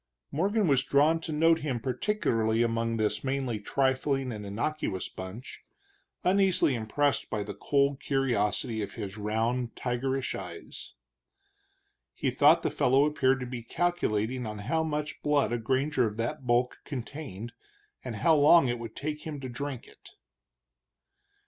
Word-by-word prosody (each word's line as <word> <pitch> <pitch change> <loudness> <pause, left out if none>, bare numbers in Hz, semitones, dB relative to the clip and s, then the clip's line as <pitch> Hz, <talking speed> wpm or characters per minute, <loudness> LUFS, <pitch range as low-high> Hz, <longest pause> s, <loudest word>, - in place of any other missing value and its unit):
Morgan 200 +6 +1
was 135 -3 +4
drawn 145 +4 +3
to 160 - -6
note 165 +2 +4
him 135 -6 -2
particularly 115 - 0
among 115 0 0
this 110 -1 0
mainly 130 -4 -1
trifling 135 +3 0
and 105 -2 -6
innocuous 105 -1 -2
bunch, 95 +7 -9 0.6
uneasily 190 -6 +3
impressed 130 +5 0
by 105 -2 -2
the - - -6
cold 140 -1 +1
curiosity 120 -4 0
of 100 0 -5
his 100 0 -5
round, 115 +3 -1
tigerish 130 +2 -2
eyes. - - -8 1.2
He - - 0
thought - - +5
the - - 0
fellow 135 +3 +3
appeared 135 -3 +2
to - - -3
be 125 -1 -5
calculating 125 -6 -1
on 105 0 -5
how 160 +7 +1
much 150 -1 -3
blood 145 -6 +2
a 120 - 0
granger 130 +2 +1
of 105 0 -6
that 125 +4 -3
bulk 120 +1 +2
contained, 120 -5 -7 0.5
and 125 -3 -5
how 165 +8 +3
long 150 -1 +6
it 120 0 -2
would 115 -1 -7
take 150 +1 -4
him 150 -2 -6
to 130 - -5
drink 135 0 -5
it. - - -17
130 Hz, 150 wpm, -29 LUFS, 115-150 Hz, 1.2 s, long